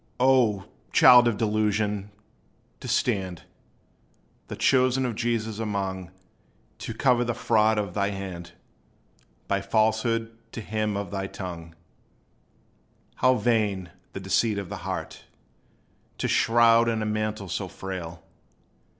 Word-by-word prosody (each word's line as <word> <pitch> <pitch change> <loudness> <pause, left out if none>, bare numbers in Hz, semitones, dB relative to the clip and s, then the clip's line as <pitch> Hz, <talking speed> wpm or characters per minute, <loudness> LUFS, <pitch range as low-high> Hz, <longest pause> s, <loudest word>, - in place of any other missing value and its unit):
O 125 -7 +3 0.3
child 125 -1 +7
of 115 -3 0
delusion! 105 -1 0 0.7
to - - -8
stand 95 -7 -1 1.0
The - - -6
chosen 130 0 +2
of 120 - -2
Jesus 110 -1 -2
among, 95 -4 -3 0.7
To 115 - -6
cover 125 -1 +3
the 120 -1 -2
fraud 110 -1 +2
of 100 -4 -2
thy 100 0 0
hand, 90 -4 -7 0.9
By 100 0 0
falsehood 110 +2 0 0.2
to 115 - -5
him 105 -1 -2
on 100 -2 -5
thy 95 -1 -3
tongue! 85 -4 -8 1.4
How 130 0 +4
vain, 105 -7 0 0.2
the - - -5
deceit 95 +3 +1
of 100 -3 -5
the - - -5
heart - - -6 0.9
To - - -1
shroud 115 0 +4
in 110 -1 -1
a - - -2
mantle 110 -1 -2
so 95 +2 -3
frail! 85 -3 -7
105 Hz, 125 wpm, -26 LUFS, 95-115 Hz, 1.4 s, child